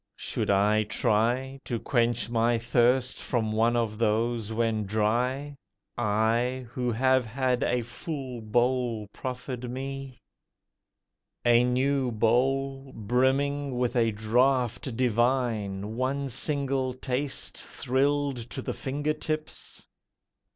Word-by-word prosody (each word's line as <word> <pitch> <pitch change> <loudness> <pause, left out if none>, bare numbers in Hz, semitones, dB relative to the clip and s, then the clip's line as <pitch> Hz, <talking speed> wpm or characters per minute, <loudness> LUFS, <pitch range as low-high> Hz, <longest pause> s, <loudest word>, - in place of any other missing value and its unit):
Should - - -2
I 105 +2 +4
try 120 +5 0
To 120 -3 -2
quench 120 -1 +1
my 115 0 +2
thirst 120 +2 +2
from 110 -3 -1
one 115 +2 +2
of 115 -2 -1
those, 115 0 0
when 110 -2 0
dry— 125 +7 0 0.4
I 120 +3 +1
who 125 -1 -1
have 130 +2 +3
had 125 +1 0
a 125 -1 +1
full 130 0 -6
bowl 120 0 +1
proffered 125 -1 -5
me— 135 0 -5 1.3
A 120 0 +6
new 130 +1 +1
bowl 135 +4 +1
brimming 130 +4 +1
with 125 0 0
a 115 -2 +3
draught 120 +3 +1
divine, 115 -5 0
One 135 +2 -1
single 135 -1 -1
taste 130 +2 -3
thrilled 140 +1 0
to 130 - -5
the - - -3
finger 145 +3 -2
tips? 155 0 -5
125 Hz, 110 wpm, -27 LUFS, 115-135 Hz, 1.3 s, A